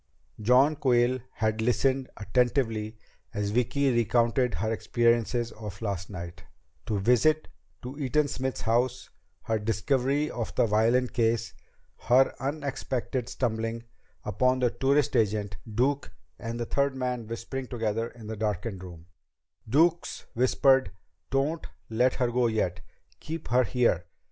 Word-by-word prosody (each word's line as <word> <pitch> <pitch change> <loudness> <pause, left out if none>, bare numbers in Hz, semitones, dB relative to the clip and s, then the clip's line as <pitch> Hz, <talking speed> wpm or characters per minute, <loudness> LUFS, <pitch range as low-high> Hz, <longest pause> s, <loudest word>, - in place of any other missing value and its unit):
John 130 +7 +5
Quayle 125 -1 +3
had 110 0 0
listened 130 +3 +1
attentively 110 0 0 0.4
as 105 0 -1
Vicki 130 +4 +2
recounted 120 +1 +2
her 110 +1 -1
experiences 120 +1 +1
of 105 -3 -8
last 100 -5 -3
night 85 -3 -8 0.4
the 105 - 0
visit 125 +9 +3 0.4
to 125 +2 -6
Eaton 145 +2 +1
Smith's 130 -1 -3
house; 120 +3 0 0.3
her 110 -1 0
discovery 135 +7 0
of 115 -2 -4
the - - +4
violin 115 +4 +3
case; 115 -2 0 0.5
her 130 +3 +5
unexpected 135 -3 -3
stumbling 115 -1 -2 0.4
upon 125 +5 +2
the 125 -2 +2
tourist 140 +1 +1
agent, 105 -3 +1
Duke, 135 +6 0 0.3
and 115 0 -5
the 120 - -1
third 140 +2 0
man 125 -3 -3
whispering 120 +3 -5
together 115 -2 -1
in 120 -2 -13
the 110 +1 -5
darkened 105 -2 -3
room; 85 -3 -10 0.6
Duke's 165 +7 +2
whispered 130 0 +3 0.4
"_Don't 145 +5 0 0.2
let 125 +3 +2
her 125 -2 0
go 125 0 +2
yet! 105 -6 -1 0.4
Keep 160 +2 -6
her 125 +1 +4
here! 115 -9 +1
120 Hz, 130 wpm, -28 LUFS, 110-130 Hz, 0.6 s, John